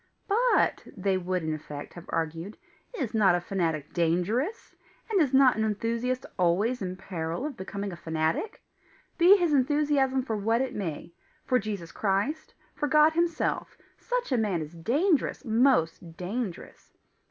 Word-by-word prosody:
"But," 470 Hz, +4 st, +2 dB, 0.2 s
they 195 Hz, 0 st, +1 dB
would 185 Hz, -1 st, -2 dB
in 155 Hz, 0 st, -1 dB
effect 150 Hz, -1 st, -7 dB
have 175 Hz, -, -11 dB
argued, 165 Hz, +5 st, -3 dB, 0.4 s
"is 245 Hz, -7 st, -3 dB
not 200 Hz, -5 st, +4 dB
a -, -, +1 dB
fanatic 165 Hz, -5 st, -2 dB
dangerous? 185 Hz, -, -1 dB, 0.4 s
and 395 Hz, -4 st, +4 dB
is 285 Hz, -5 st, +2 dB
not 265 Hz, -1 st, +6 dB
an 220 Hz, -, +1 dB
enthusiast 230 Hz, +4 st, -1 dB
always 200 Hz, +8 st, +2 dB
in 185 Hz, -1 st, -3 dB
peril 175 Hz, -, -4 dB
of 300 Hz, -3 st, -4 dB
becoming 200 Hz, 0 st, -5 dB
a -, -, -6 dB
fanatic? 160 Hz, -, -2 dB, 0.6 s
Be 365 Hz, +4 st, +8 dB
his 345 Hz, -5 st, +1 dB
enthusiasm 275 Hz, -1 st, +2 dB
for 225 Hz, -3 st, -2 dB
what 225 Hz, +3 st, +1 dB
it 260 Hz, 0 st, -1 dB
may 170 Hz, -5 st, -5 dB, 0.3 s
for 255 Hz, -1 st, +3 dB
Jesus 200 Hz, -6 st, -5 dB
Christ, 205 Hz, +10 st, -1 dB, 0.2 s
for 295 Hz, -, -2 dB
God 305 Hz, +2 st, +5 dB
himself, 335 Hz, 0 st, -1 dB, 0.2 s
such -, -, -2 dB
a 255 Hz, -, +3 dB
man 195 Hz, -7 st, 0 dB
is 150 Hz, +2 st, -10 dB
dangerous 280 Hz, -, 0 dB
most 220 Hz, -9 st, +2 dB
dangerous! 195 Hz, +1 st, -6 dB
215 Hz, 155 wpm, -28 LUFS, 175-270 Hz, 0.6 s, Be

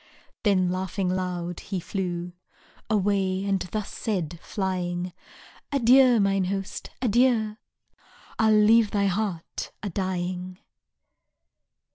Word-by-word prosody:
Then, 185 Hz, -4 st, +2 dB
laughing 185 Hz, 0 st, -2 dB
loud, 180 Hz, -2 st, -2 dB
he 195 Hz, -2 st, -4 dB
flew 175 Hz, -1 st, -3 dB, 0.6 s
Away, 195 Hz, -2 st, +1 dB
and 195 Hz, -1 st, +1 dB
thus 215 Hz, -2 st, -3 dB
said, 175 Hz, -6 st, -3 dB
flying: 180 Hz, -2 st, -2 dB, 0.6 s
Adieu, 255 Hz, -2 st, +6 dB
mine 195 Hz, -1 st, +2 dB
host, 195 Hz, +1 st, -4 dB
adieu, 230 Hz, -2 st, +3 dB, 0.8 s
I'll 220 Hz, -1 st, +4 dB
leave 215 Hz, +1 st, +5 dB
thy 200 Hz, -1 st, +1 dB
heart 195 Hz, -3 st, -2 dB
a 205 Hz, -, -3 dB
dying. 185 Hz, 0 st, -3 dB
195 Hz, 100 wpm, -26 LUFS, 180-210 Hz, 0.8 s, Adieu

